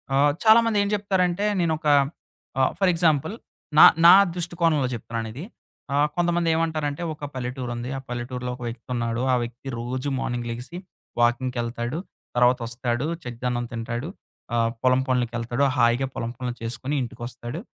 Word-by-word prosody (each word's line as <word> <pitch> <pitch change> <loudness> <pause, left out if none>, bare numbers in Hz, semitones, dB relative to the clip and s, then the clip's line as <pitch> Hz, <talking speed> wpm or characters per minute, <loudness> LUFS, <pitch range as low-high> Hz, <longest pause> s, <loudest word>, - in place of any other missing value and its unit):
ఆహ్, 145 +1 +4
చాలామందేం 220 -2 +5
జెప్తారంటే 195 -2 +1
నేనొక 160 -2 0 0.7
ఆ! - - +4 0.2
ఫర్ 195 -2 +4
ఎగ్జాంపుల్ 160 0 +2 0.4
నా - - +11 0.2
నా 170 - +11 0.2
దృష్టికోణంలో 170 -5 0
చెప్తున్నానిది. 115 +3 -5 0.5
ఆహ్, 145 +1 +3
కొంతమంది 175 -1 +1
ఏమంటారంటే, 160 -1 -1
ఒక 150 -1 -7
పల్లెటూరుంది. 125 -1 -4
ఆ - - -4
పల్లెటూరులో 125 +1 -4
ఒక - - -15
వ్యక్తివున్నాడు. 115 0 -3
ఆ - - +5
వ్యక్తి 120 +3 -8
రోజు 125 +4 -3
మార్నింగ్ 120 -2 -3
లెగిసి, 125 +9 -7 0.4
వాకింగ్‌కెళ్తాడు. 120 +2 0 0.4
తర్వాత 125 +1 +4
ఒస్తాడు 120 +2 -2 0.2
చద్డన్నం 120 0 -3
తింటాడు. 120 +4 -4 0.5
ఆహ్, 115 -1 +2
పొలం 130 0 +4
పొనులకెళ్తాడు. 120 +1 0
హాయిగా 120 +3 +3
పొలం 115 0 -3
పొనులు 125 -1 -4
చేసుకుని 120 +5 -3
ఇంటికొస్తాడు. 120 +4 -7
125 Hz, 130 wpm, -24 LUFS, 120-160 Hz, 0.7 s, నా